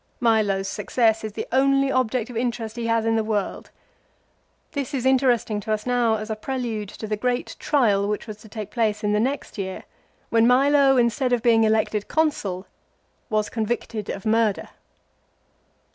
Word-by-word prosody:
Milo's 210 -5 +2
success 220 +2 +1
is 215 -1 -5
the - - -4
only 275 +1 +3
object 250 -2 0
of - - -10
interest 230 -1 -2
he 235 -1 -3
has 230 -1 +1
in 225 0 +2
the 220 - +1
world. 210 -3 -3 1.0
This 285 0 -3
is 260 -1 -2
interesting 250 -5 +2
to 210 +2 -5
us 215 0 -1
now 245 -3 +2
as 215 +1 -5
a - - -1
prelude 225 -3 -4
to 220 - -8
the 215 0 -1
great 245 +3 -2
trial 210 -9 +2
which 210 0 -2
was 215 -2 -8
to 215 0 -15
take 210 -1 -7
place 215 -1 0
in 210 0 +1
the 210 - +2
next 260 -1 -2
year, 190 -1 -4 0.5
when 230 0 +4
Milo 275 +1 +4
instead 245 +2 +2
of 240 -2 +1
being 225 -2 +4
elected 215 -1 +1
Consul 205 - -1 0.6
was 215 -2 +1
conyicted 220 -1 -3
of 195 - -5
murder. 220 -2 +1
225 Hz, 175 wpm, -23 LUFS, 215-250 Hz, 1.0 s, when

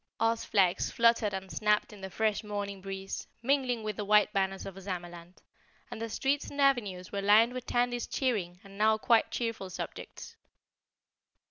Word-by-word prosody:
Oz 225 0 +1
flags 185 -4 +2
fluttered 230 -3 +3
and 190 -1 -6
snapped 210 0 +1
in 205 - -12
the 190 - -6
fresh 215 +1 0
morning 205 -2 -4
breeze, 195 0 -6 0.2
mingling 255 -3 +1
with 215 -2 -4
the 210 - -2
white 210 +1 +4
banners 195 -1 -1
of 195 - -6
Ozamaland, 175 -2 -8 0.5
and 220 - -6
the 230 - -3
streets 275 +5 -1
and 285 - -8
avenues 215 -10 +1
were 200 - -2
lined 215 +4 +5
with 255 -1 -6
Tandy's 245 0 0
cheering 200 -10 -1
and 195 0 -13
now 220 +1 +4
quite 230 +1 +3
cheerful 230 -5 -3
subjects. 185 - -8
210 Hz, 165 wpm, -30 LUFS, 195-230 Hz, 0.5 s, lined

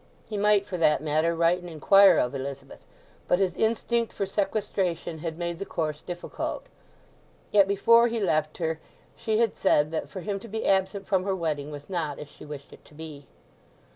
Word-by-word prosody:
He 215 - -6
might, 205 -1 +3
for 185 -3 -5
that 150 -4 +3
matter, 155 +2 +1
write 170 +2 +3
and 175 -1 -9
inquire 195 +5 +6
of 125 +2 +1
Elizabeth; 135 0 -6 0.5
but 180 - +3
his 185 -2 0
instinct 230 +1 0
for 200 - -2
sequestration 195 -4 -2
had 160 0 -5
made 170 -1 -3
the - - -2
course 155 -4 -3
difficult. 175 -1 -5 0.9
Yet 200 -2 +5
before 230 +4 +5
he 230 -1 -2
left 155 -6 0
her 160 -2 -2 0.4
she 220 -2 -1
had 230 -1 +2
said 150 -5 +2
that 160 - -3
for 185 - -7
him 200 +1 -3
to 230 - -11
be 220 +1 -4
absent 190 +1 +1
from 190 -2 +1
her 195 0 -1
wedding 150 -5 -2
was 145 -1 -9
not 160 -6 -3
as 150 - -9
she - - -13
wished 145 -2 -9
it - - -16
to 150 - -18
be. 150 -3 -9
175 Hz, 195 wpm, -26 LUFS, 155-200 Hz, 0.9 s, inquire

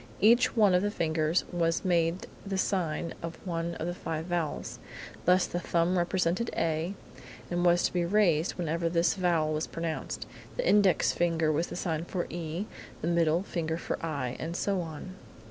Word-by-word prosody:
Each 240 +5 +5
one 210 -5 +5
of 180 - +4
the 205 - +1
fingers 160 -3 +1
was 165 -1 0
made 170 0 +1 0.2
the 195 -1 -3
sign 170 -4 -1
of 165 0 -5
one 170 -1 -2
of 160 - -4
the 175 - -2
five 160 -2 -4
vowels. 170 -3 -2 0.5
Thus 180 +1 +5
the 175 - -3
thumb 170 +1 +1
represented 180 +4 +1
A 165 +3 0 0.6
and 175 0 0
was 175 0 +4
to - - +1
be 175 -1 +1
raised 170 -3 +3
whenever 165 -1 -1
this 170 0 +3
vowel 170 -5 +1
was 155 +1 -1
pronounced; 165 -1 -4 0.3
the - - 0
index 200 -3 +4
finger 165 -2 +1
was 160 +3 0
the - - -7
sign 165 -2 -2
for 175 -1 -2
E; 170 +3 -3 0.4
the - - 0
middle 170 0 +2
finger 160 -4 -2
for 170 - -4
I; 140 -6 -2
and 165 +2 -4
so 195 -2 0
on. 165 +2 -7
170 Hz, 180 wpm, -29 LUFS, 165-180 Hz, 0.6 s, Each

